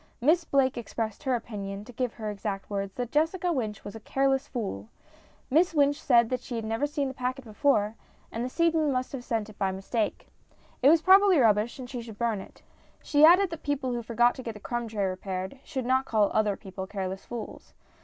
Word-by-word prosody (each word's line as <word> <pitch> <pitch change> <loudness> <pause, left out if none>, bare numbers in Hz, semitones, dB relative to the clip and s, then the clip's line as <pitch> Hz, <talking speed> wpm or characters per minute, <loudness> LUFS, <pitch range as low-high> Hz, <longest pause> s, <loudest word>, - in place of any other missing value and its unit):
Miss 325 +7 +3
Blake 265 -3 +2
expressed 220 -2 -4
her 265 -4 +1
opinion, 205 -3 -6
to 245 - -11
give 250 0 -2
her 215 -2 -4
exact 200 -1 -5
words, 195 -1 -3
that 245 -2 -4
Jessica 335 +4 +1
Wynch 220 -7 -3
was 205 - -8
a - - -7
careless 270 +4 0
fool. 115 - -5 0.6
Miss 330 +4 +3
Wynch 290 +1 +3
said 240 0 +3
she 250 0 -7
had 225 -1 -3
never 225 +6 0
seen 290 -1 -2
the 265 - -5
packet 255 +1 -3
before, 215 -2 +1 0.4
and 230 - -3
the 250 - -2
seedsman 325 0 +2
must 255 -1 -2
have 265 -3 -6
sent 225 -3 -2
it 205 - -21
by 195 -1 +1
mistake. 205 +3 -3 0.5
It 265 - +7
was 320 +1 +5
probably 385 -1 +7
rubbish, 220 -1 +3
and 255 -2 -7
she 245 -1 -5
should 225 -3 -10
burn 225 -4 0
it. - - -15 0.4
She 295 0 +3
added 360 +3 +6
that 330 - -6
people 280 -3 -1
who 240 - -2
forgot 240 +1 +2
to - - -8
get 230 -3 -6
the - - -9
crumb 240 +2 -3
tray 210 -3 -1
repaired 190 +4 -4
should 265 -5 -4
not 260 +1 +2
call 215 -4 +2
other 215 -2 +2
people 190 -2 -7
careless 190 -1 -4
fools. 235 -3 -8
240 Hz, 215 wpm, -28 LUFS, 210-275 Hz, 0.6 s, It